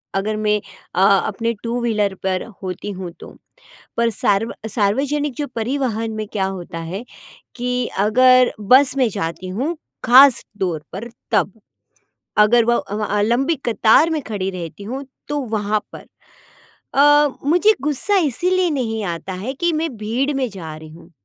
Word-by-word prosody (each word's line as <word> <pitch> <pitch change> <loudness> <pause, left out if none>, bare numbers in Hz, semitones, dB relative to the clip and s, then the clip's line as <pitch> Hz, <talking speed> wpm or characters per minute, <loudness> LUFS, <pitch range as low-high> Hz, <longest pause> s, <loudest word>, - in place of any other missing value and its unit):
अगर 210 +3 -1
मैं 210 0 +1 0.4
अ, - - +2
अपने 200 +4 +2
टू 235 +1 -2
व्हीलर 210 -4 0
पर 185 -1 0 0.2
होती 185 +2 -5
हूँ 185 -2 -6
तो। - - -10 0.7
पर 235 0 +3
सार्व 205 0 +1
अ, - - -2
सार्वजनिक 270 +7 0
जो 290 - -2
परिवहन 230 -2 -1
में 215 -1 -4
क्या 200 -2 -1
होता 180 -3 -6
है 195 +6 -5 0.5
कि 250 0 -1
अगर 255 +4 +5
बस 255 +6 +5
में 255 -2 +3
जाती 170 -1 -4
हूँ, 265 - -2 0.3
ख़ासतौर 220 - +4
पर 215 +6 -6 0.2
तब, 200 - +2 0.9
अगर 225 +3 +5
वो 240 +1 +3
अ 205 - -4 0.2
अ, - - +2
लंबी 255 +9 +1
कतार 235 +7 +4
में 315 -2 -1
खड़ी 200 -5 -3
रहती 180 +1 -7
हूँ, 260 +6 -5 0.2
तो 295 0 -1 0.2
वहाँ 210 0 0
पर - - -11 0.9
अ, 290 +1 +6 0.2
मुझे 355 +7 +5
गुस्सा 300 +8 +1
इसलिए 360 +6 +1
नहीं 225 -7 -2
आता 175 +1 -4
है 200 +8 -4
कि 345 +4 0
मैं 320 +1 0
भीड़ 235 +7 -1
में 260 -2 0
जा 165 -6 -8
रही 155 0 -11
हूँ। 165 +2 -15
225 Hz, 160 wpm, -20 LUFS, 200-270 Hz, 0.9 s, अ